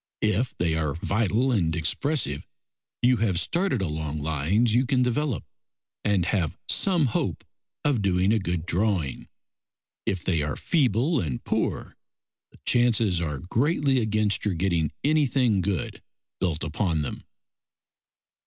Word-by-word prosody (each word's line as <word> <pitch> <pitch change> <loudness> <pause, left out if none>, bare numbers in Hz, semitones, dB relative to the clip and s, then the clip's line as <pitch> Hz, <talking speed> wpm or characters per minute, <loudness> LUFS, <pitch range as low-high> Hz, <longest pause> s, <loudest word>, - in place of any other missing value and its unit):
If 110 +4 0
they 85 -2 +1
are 75 -3 -1
vital 110 +8 +1
and 85 -8 +1
expressive, 85 - -1 0.6
you 125 0 +5
have 100 -5 +1
started 165 - 0
along 75 -2 -3
lines 80 - +1
you 125 +2 +3
can 130 -2 +2
develop, 125 - -1 0.6
and 100 -4 +2
have 90 -5 0
some 175 -6 +3
hope 115 - -1 0.4
of 140 -7 +2
doing 95 +1 +2
a 110 - +2
good 85 -4 -2
drawing. 90 -5 -1 0.8
If 95 -3 -1
they 85 -5 +1
are 75 0 -2
feeble 140 - +1
and 70 - -3
poor, - - -2 0.6
the - - -19
chances 115 -7 +3
are 75 -5 -3
greatly 140 +1 +2
against 110 -2 0
your 100 -4 0
getting 85 -4 0
anything 135 -8 +2
good 95 -3 -2 0.4
built 85 -4 -1
upon 80 0 -1
them. - - -5
100 Hz, 135 wpm, -26 LUFS, 85-125 Hz, 0.8 s, you